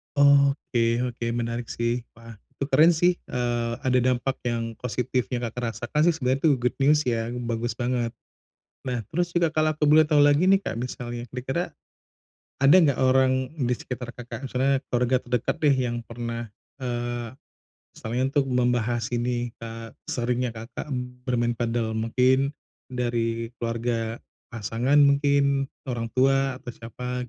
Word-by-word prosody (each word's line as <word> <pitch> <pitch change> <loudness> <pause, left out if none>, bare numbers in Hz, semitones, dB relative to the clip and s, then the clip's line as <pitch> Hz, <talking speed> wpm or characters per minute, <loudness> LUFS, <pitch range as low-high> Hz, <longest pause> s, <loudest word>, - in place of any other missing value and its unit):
Oke 140 -4 +3
oke, 120 -1 -5
menarik 120 0 -3
sih. 120 +1 -1
Wah, 115 -1 -13 0.2
itu 140 - -4
keren 155 +6 +6
sih, 175 +2 +3 0.2
eee, 120 -1 -1
ada 130 -2 +2
dampak 130 +2 -1
yang 115 -2 -2
positifnya 125 0 -2
Kakak 115 0 -3
rasakan 150 +7 0
sih, 175 - +5
sebenarnya 135 -3 0
itu 160 - +6
good 125 0 0
news, 145 +2 +4
ya, 115 0 -1
bagus 120 -1 -2
banget. 120 -1 -1 0.7
Nah, 125 -2 -2
terus 175 +1 -1
juga 170 -2 +3
kalau 155 0 +1
aku 150 -1 +1
boleh 155 0 +7
tahu 150 -1 +4
lagi 145 +4 +5
nih, 195 +1 +5
Kak, 115 - -4
misalnya 120 -1 -5
kira-kira 135 +7 -3 0.9
ada 140 +5 +7
enggak 150 -7 +3
orang 130 0 +3 0.2
di 125 - +2
sekitar 125 0 -6
Kakak, 120 +1 -8
misalnya 135 +1 +1 0.2
keluarga 125 +1 +3
terdekat 125 -1 -1
deh 145 - +6
yang 125 -3 -1
pernah, 115 0 -5 0.3
eee, 120 -2 -3 0.7
misalnya 120 +3 -3
untuk 145 -1 +3
membahas 120 -2 +1
ini, 120 0 -1
eee, 115 0 -8 0.2
seringnya 125 +1 0
Kakak 115 +6 -7 0.4
bermain 120 -1 +1
padel 115 -1 -1
mungkin 130 +5 +2 0.3
dari 115 -2 -2
keluarga 115 -1 -2 0.3
pasangan 115 +5 0
mungkin, 140 -1 +4 0.2
orang 120 -3 -3
tua 135 0 +3
atau 120 -1 -8
siapa? 125 +2 -6
125 Hz, 145 wpm, -25 LUFS, 120-135 Hz, 0.9 s, boleh